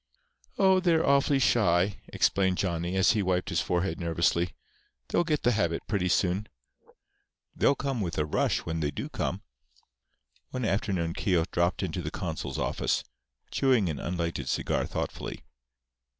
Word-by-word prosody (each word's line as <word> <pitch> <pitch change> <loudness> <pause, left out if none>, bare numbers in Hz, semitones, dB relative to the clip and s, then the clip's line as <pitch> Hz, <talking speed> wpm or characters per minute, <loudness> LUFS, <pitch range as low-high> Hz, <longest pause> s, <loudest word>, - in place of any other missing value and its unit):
"Oh, 190 -1 +5
they're 170 -3 +3
awfully 140 0 +4
shy," 100 -6 +3
explained 95 -1 +1
Johnny, 85 -1 -1
as 95 - +5
he 110 - +1
wiped 90 0 0
his 85 -3 +1
forehead 90 +3 -1
nervously. 85 0 +1 0.5
"They'll 175 - +2
get 155 -3 -1
the 120 - +4
habit 85 -7 0
pretty 100 -4 0
soon. 95 +2 +1 1.1
They'll 140 - +3
come 135 -4 -2
with 85 -4 -3
a 75 - +1
rush 75 - +1
when 80 -1 -2
they 75 -2 0
do - - -5
come." - - -3 1.1
One 125 -2 -3
afternoon 95 -5 0
Keogh 95 -4 +1
dropped 85 +1 +1
into - - -2
the - - -3
consul's - - -4
office, - - 0 0.5
chewing 125 -9 +3
an 75 - -3
unlighted 85 -6 -3
cigar - - 0
thoughtfully. - - -5
95 Hz, 150 wpm, -28 LUFS, 85-115 Hz, 1.1 s, Oh